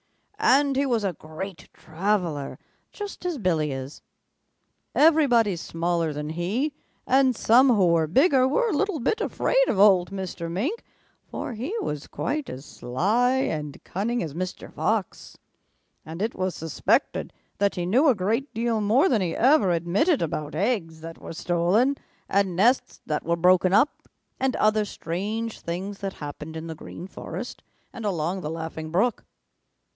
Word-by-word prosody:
And 285 -10 +4
he 275 +1 +1
was 235 -4 +1
a 195 -3 0
great 160 +3 -8
traveler, 170 -4 -2 0.3
just 410 -3 -7
as 355 -4 -2
Billy 165 - 0
is. 135 +1 -6 0.9
Everybody 275 - +4
smaller 170 -1 -1
than 150 +1 -4
he 205 - -1 0.3
and 260 -1 +3
some 245 +5 +5
who 210 -6 +4
were 165 -2 +3
bigger 265 - +4
were 470 - +1
a 345 - 0
little 400 -1 0
bit 435 - 0
afraid - - +1
of - - 0
old 190 -3 +5
Mr. 185 -3 -5
Mink, 255 - -2 0.5
for - - -5
he 260 - -4
was 150 -1 -4
quite 285 - -3
as 130 +3 -8
sly 210 - +1
and 150 - -2
cunning 230 +5 -2
as 155 -4 -5
Mr. 185 +3 -5
Fox, - - -2 0.7
and 160 +2 -8
it 225 - -1
was 185 -1 -2
suspected 160 -1 0 0.3
that 200 0 +2
he 175 -2 -2
knew 250 - +3
a 265 - +5
great 225 +9 -1
deal 230 -1 0
more 230 - +4
than 235 - +2
he 175 -3 -1
ever 260 -5 +4
admitted 175 - +2
about 150 -2 -4
eggs 165 -5 -1
that 165 0 -9
were - - -8
stolen 180 +11 +2 0.3
and 195 -2 +1
nests 235 +8 +2
that 150 - -2
were 170 +1 +1
broken 180 +1 +4
up, 235 +9 +2 0.3
and 265 -1 +1
other 215 0 +2
strange 210 +5 -4
things 190 +4 -5
that 195 -1 -4
happened 150 +2 -7
in 160 - -6
the 165 - -5
Green 160 +2 -9
Forest 190 - -7 0.3
and 230 - -7
along 185 -2 -1
the 150 - -4
Laughing 160 -1 -5
Brook. 205 +9 +1
195 Hz, 160 wpm, -25 LUFS, 165-245 Hz, 0.9 s, some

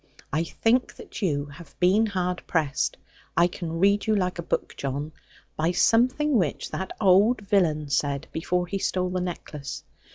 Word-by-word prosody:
I 155 +3 +2
think 235 +8 +1
that - - -10
you 145 -7 0
have 145 +1 -14
been 195 +5 +4
hard 180 -3 -2
pressed 150 -5 0 0.4
I 170 - +6
can 170 -2 -4
read 200 +4 +3
you 215 - +3
like 180 -3 -1
a - - 0
book, - - -2
John 140 +3 -3 0.4
by 165 +3 0
something 255 +6 +3
which 165 -6 -2
that 190 - -4
old 205 +4 +4
villain 170 -7 +1
said, 140 0 0
before 180 +2 -1
he 195 +3 -3
stole 185 -1 -1
the 185 0 -1
necklace. 150 -5 -6
180 Hz, 165 wpm, -26 LUFS, 155-200 Hz, 0.4 s, I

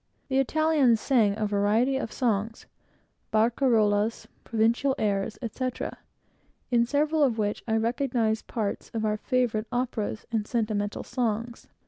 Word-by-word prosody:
The 265 0 +2
Italians 285 -4 +3
sang 220 -7 +2
a 215 - 0
variety 210 +6 +2
of 265 -4 -3
songs 225 -2 -1 0.7
barcarollas, 220 -2 +2 0.2
provincial 235 +4 +1
airs, 200 0 -1
etc.; 255 +2 -4 0.7
in 235 -1 +3
several 300 +3 +1
of 255 -6 +3
which 210 -1 -1
I 220 - +1
recognized 230 -1 0
parts 215 -4 -3
of 220 -1 -1
our 210 0 0
favorite 235 -2 0
operas 240 -3 -2
and 215 -2 -1
sentimental 215 -3 -1
songs. 235 -1 -3
230 Hz, 125 wpm, -27 LUFS, 215-255 Hz, 0.7 s, Italians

